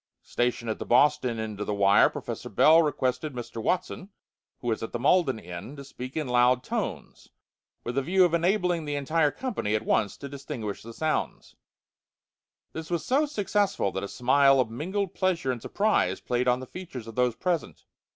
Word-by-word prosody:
Stationed 120 -1 -1
at - - -5
the - - -3
Boston 125 -1 +3
end 110 -2 -5
of - - -3
the 105 - -1
wire, 100 0 +5
Professor - - -6
Bell 160 +2 +6
requested 145 -1 -1
Mr. 120 -2 -6
Watson, 185 - -2 0.5
who 120 - -3
was 110 - -1
at 115 - -6
the - - -1
Malden 140 -2 +3
end, 90 - -8
to 140 - -8
speak 130 0 -8
in 155 -3 -2
loud 125 0 +3
tones, - - -5 0.5
with 120 - -4
a - - 0
view 185 +6 +4
of 170 - 0
enabling 175 -1 +1
the 145 -1 -3
entire 150 +2 +1
company 210 - -2
at 110 +1 -2
once 105 -2 +1
to 140 - -7
distinguish 135 -6 -6
the 115 - -10
sounds. 155 +6 -3 1.2
This 160 0 -7
was 170 -2 -2
so 285 +4 +2
successful 205 - 0
that 95 - -4
a 100 - -4
smile 135 +4 +4
of 120 -3 +1
mingled 190 - -3
pleasure 180 -8 0
and 120 -3 -5
surprise 215 - +1
played 125 0 -1
on 125 +1 +2
the - - -6
features 135 -7 -8
of 115 - -9
those 125 0 +1
present. 175 +1 -3
135 Hz, 190 wpm, -27 LUFS, 120-170 Hz, 1.2 s, Bell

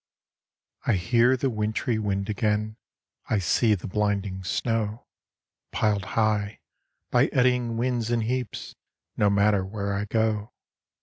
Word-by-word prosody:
I 120 - +4
hear 120 +7 +3
the 135 +1 0
wintry 110 +1 -1
wind 100 -2 -1
again, 105 0 0 0.5
I 110 - +2
see 105 +4 +3
the 90 - -8
blinding 100 -2 -1
snow, 110 +3 -1 0.7
Pil'd 105 -4 +1
high, 105 -1 +1 0.5
by - - +4
eddying 125 -2 +1
winds, 120 -1 0
in 120 -1 +1
heaps, 125 -1 -3 0.4
No 105 - +3
matter 100 -1 +3
where 100 +1 -3
I 100 +1 -1
go. 110 0 0
105 Hz, 125 wpm, -26 LUFS, 100-115 Hz, 0.7 s, I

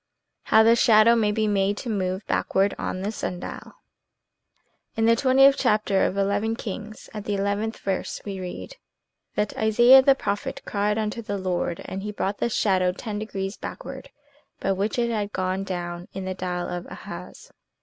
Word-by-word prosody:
HOW 220 - +6
THE 230 +1 +6
SHADOW 230 0 +6
MAY 215 -3 +2
BE 215 0 0
MADE 200 0 +1
TO - - -6
MOVE 190 -1 -2
BACKWARD 195 +1 +1
ON 185 - -3
THE 205 - -1
SUN 180 -4 -4
DIAL - - -8 1.2
N 225 - +2
the 230 0 +5
twentieth 270 +2 +5
chapter 210 -5 +2
of 195 - -4
II 205 +3 +1
Kings, 215 -1 -7
at 210 -1 -6
the 205 - -1
eleventh 205 +3 -1
verse 195 -2 -3
we 195 -2 -5
read, 185 - -7 0.6
that 210 - -1
"Isaiah 240 +5 +7
the 270 +1 +5
prophet 200 -5 -3
cried 210 +1 0
unto 215 +1 -2
the 205 -2 -4
Lord, 180 -3 -2
and 190 - -5
he 210 +1 -4
brought 200 -1 -3
the - - 0
shadow 185 -5 +2
ten 210 +1 -5
degrees 195 -1 -4
backward, - - -8 0.5
by 195 - 0
which 200 +4 -1
it 235 -1 +1
had 210 -2 -2
gone 185 +1 -1
down 175 -2 -5
in 190 - -5
the 190 - -2
dial 180 -1 -3
of 175 0 -5
Ahaz." - - -10
205 Hz, 180 wpm, -25 LUFS, 190-220 Hz, 1.2 s, Isaiah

